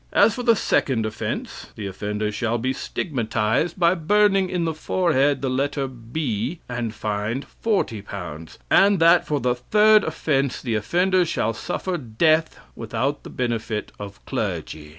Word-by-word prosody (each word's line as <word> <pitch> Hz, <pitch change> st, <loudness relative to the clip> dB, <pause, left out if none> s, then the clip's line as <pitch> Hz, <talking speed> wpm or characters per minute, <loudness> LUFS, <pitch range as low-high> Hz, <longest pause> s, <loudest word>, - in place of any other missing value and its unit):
As 225 Hz, -, +5 dB
for 245 Hz, -, -4 dB
the 235 Hz, -2 st, +4 dB
second 125 Hz, -, +1 dB
offense, 110 Hz, -, -5 dB
the 105 Hz, -, -6 dB
offender 105 Hz, +2 st, -3 dB
shall 115 Hz, +2 st, -1 dB
be 130 Hz, +3 st, -1 dB
stigmatized 125 Hz, -, -1 dB
by 170 Hz, 0 st, +5 dB
burning 195 Hz, +2 st, +3 dB
in 180 Hz, -2 st, -1 dB
the 160 Hz, -, -1 dB
forehead 145 Hz, -5 st, +1 dB
the 135 Hz, -, 0 dB
letter 140 Hz, +1 st, -1 dB
B, 125 Hz, -, -4 dB
and 120 Hz, -2 st, -3 dB
fined 110 Hz, +4 st, -3 dB, 0.2 s
L40. 100 Hz, -, -3 dB
And 200 Hz, 0 st, +5 dB
that 170 Hz, +1 st, +5 dB
for 150 Hz, -1 st, 0 dB
the 125 Hz, 0 st, +1 dB
third 210 Hz, -, +4 dB
offense, 140 Hz, -4 st, -1 dB
the 120 Hz, -4 st, -3 dB
offender 180 Hz, -, +2 dB
shall 115 Hz, -9 st, -1 dB
suffer 175 Hz, -, -3 dB
death 155 Hz, +6 st, +1 dB, 0.2 s
without 135 Hz, +5 st, -2 dB
the -, -, -10 dB
benefit 115 Hz, -3 st, -3 dB
of 100 Hz, 0 st, -9 dB
clergy." 75 Hz, -1 st, -4 dB
135 Hz, 150 wpm, -23 LUFS, 110-170 Hz, 0.2 s, As